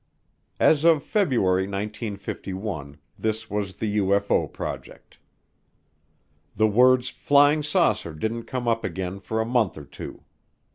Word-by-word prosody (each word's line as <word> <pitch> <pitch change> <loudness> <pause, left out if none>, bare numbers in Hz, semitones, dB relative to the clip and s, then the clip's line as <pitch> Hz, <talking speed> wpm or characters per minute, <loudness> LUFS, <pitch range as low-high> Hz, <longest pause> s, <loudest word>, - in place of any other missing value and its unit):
As 155 -1 +4
of 165 -4 +5
February 115 - +1
1951 100 - -5 0.2
this 110 0 -2
was 100 -2 -2
the 105 -1 -2
UFO 100 +1 +1
project. - - -8 1.4
The 110 - +3
words 125 +4 +4
"flying 145 +2 +4
saucer" 150 - +1
didn't 110 +7 -3
come 125 -2 -4
up 115 -1 +1
again 95 +1 -4
for 110 +3 -3
a 110 - +1
month 115 -7 +1
or 75 - -9
two. - - -10
110 Hz, 125 wpm, -25 LUFS, 95-125 Hz, 1.4 s, of